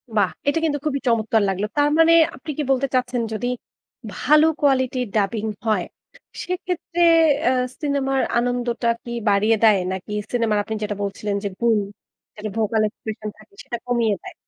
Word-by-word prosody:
বাহ! 200 -3 +3 0.2
এটা 285 +3 +2
কিন্তু 290 -2 0
খুবই 280 -2 0
চমৎকার 225 -1 +2
লাগলো। 195 +2 -1
তার 290 0 +4
মানে 325 0 +6 0.2
আপনি 270 +4 -7
কি 300 - 0
বলতে 270 +1 +2
চাচ্ছেন 250 -1 0
যদি 220 +3 -2 0.7
ভালো 305 +1 +4 0.2
কোয়ালিটির 260 -3 +1
ডাবিং 210 +1 0 0.2
হয়, 220 -1 +1 0.6
সেক্ষেত্রে 360 -1 -3 0.4
অ্যা 250 - +3 0.3
সিনেমার 275 -2 0 0.2
আনন্দটা 240 0 -1 0.2
কি 240 - -8 0.2
বাড়িয়ে 210 +3 +3
দেয়? 215 -2 +6
নাকি 190 +2 -6 0.2
সিনেমার 230 -3 +1
আপনি 220 - -4
যেটা 205 0 -2
বলছিলেন 200 +1 -3
যে, - - 0
"গুণ" 235 -2 +3 0.6
যেটা 215 0 -5
ভোকাল 220 0 +1
এক্সপ্রেশন 215 0 -7
থাকে - - -20
সেটা 240 - -5
কমিয়ে 235 -4 +1
দেয়? - - -9
235 Hz, 160 wpm, -22 LUFS, 215-270 Hz, 0.7 s, মানে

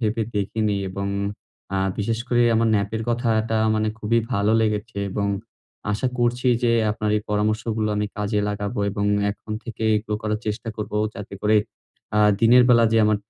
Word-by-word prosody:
ভেবে 110 0 0
দেখিনি। 105 +1 0
এবং 100 +1 -4 0.7
আ - - +1 0.2
বিশেষ 110 +2 -1
করে 120 -1 +3
আমার 115 0 +3
ন্যাপের 105 +2 -1
কথাটা 115 -2 +1 0.2
মানে 110 0 +1
খুবই 110 +2 +1
ভালো 105 0 +2
লেগেছে 105 -1 -1
এবং 100 -1 -1 0.6
আশা 110 +5 0
করছি 120 +1 +1
যে, 120 - +3 0.2
আপনার 105 0 -2
এই 105 - -2
পরামর্শগুলো 110 +1 0
আমি 105 0 0
কাজে 105 0 0
লাগাবো 105 0 -3
এবং 100 +1 -2 0.3
এখন 110 +1 -8
থেকে 115 -2 -7
এগুলো 105 0 -3
করার 105 0 -1
চেষ্টা 110 +2 -3
করবো 105 0 -4 0.2
যাতে 100 -1 -8
করে 110 +1 +4 0.6
আ - - +4 0.2
দিনের 120 +2 +7
বেলা 115 -2 +6
যে - - +4
আমার 105 0 +3
110 Hz, 165 wpm, -23 LUFS, 105-115 Hz, 0.7 s, দিনের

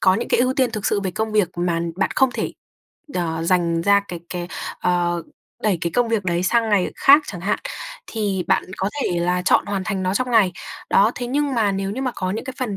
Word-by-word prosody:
có 185 - +5
những 230 +5 -2
cái - - +3
ưu 255 +1 +2
tiên 255 -3 +2
thực 215 -2 -3
sự 200 - +1
về 190 -2 -2
công 220 +4 -3
việc 210 -5 +3
mà 175 -1 0 0.2
bạn 195 - +1
không 265 -1 +4
thể, - - -2 0.6
ờ, 165 -2 -1
dành 170 -1 +1
ra 200 +2 +5
cái 175 -2 -6
cái, 175 -1 -5 0.3
ờ, 175 -1 +1 0.4
đẩy 205 -5 +2
cái 170 - -2
công 245 -1 +2
việc 225 -4 0
đấy 175 0 0
sang 225 +4 +2
ngày 195 -3 +2
khác 285 +3 +7
chẳng 180 - -6
hạn, 195 +4 0 0.5
thì 200 -5 -2
bạn 190 - +3
có 190 +2 -1
thể 175 - 0
là 180 +1 +1
chọn - - +3
hoàn 195 -2 -2
thành 195 -2 -2
nó 185 +1 0
trong 250 +3 0
ngày. 210 -6 +4 0.4
Đó, 205 +3 +5
thế 245 - -4
nhưng 280 +1 0
mà 215 -4 +2
nếu 195 0 -2
như 250 +6 -3
mà 255 -2 -1
có 185 -1 -2
những 215 - -3
cái 260 0 -6
phần 235 -6 -2
195 Hz, 245 wpm, -21 LUFS, 180-225 Hz, 0.6 s, khác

